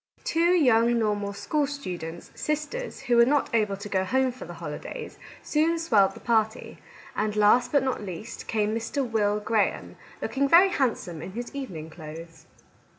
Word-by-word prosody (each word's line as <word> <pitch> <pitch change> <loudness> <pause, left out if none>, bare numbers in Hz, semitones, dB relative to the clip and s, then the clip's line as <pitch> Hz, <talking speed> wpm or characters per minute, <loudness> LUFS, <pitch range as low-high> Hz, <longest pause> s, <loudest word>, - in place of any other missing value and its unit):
Two 340 +2 +2
young 240 -6 +4
normal 205 -2 0
school 290 +8 -1
students, 175 - -6
sisters, 305 +12 -3
who 245 -3 +2
were 235 - +8
not 280 -1 +1
able 210 -3 +1
to 200 +2 -7
go 190 -2 0
home 260 +6 +1
for 250 - -10
the - - -9
holidays, - - -7 0.2
soon 320 +2 +1
swelled 210 -12 +3
the - - -10
party, 220 -1 0 0.4
and 210 0 -1
last, 210 +4 +4
but 285 -2 +3
not 260 -3 -1
least, 205 +3 -7
came 215 -1 0
Mr. 230 +4 -2
Will 210 -2 +1
Graham, 210 0 -1 0.2
looking 275 +1 0
very 360 +5 +7
handsome 225 - -1
in 185 - -7
his 240 +5 -6
evening 175 - -6
clothes. 160 0 -10
225 Hz, 165 wpm, -26 LUFS, 200-275 Hz, 0.4 s, were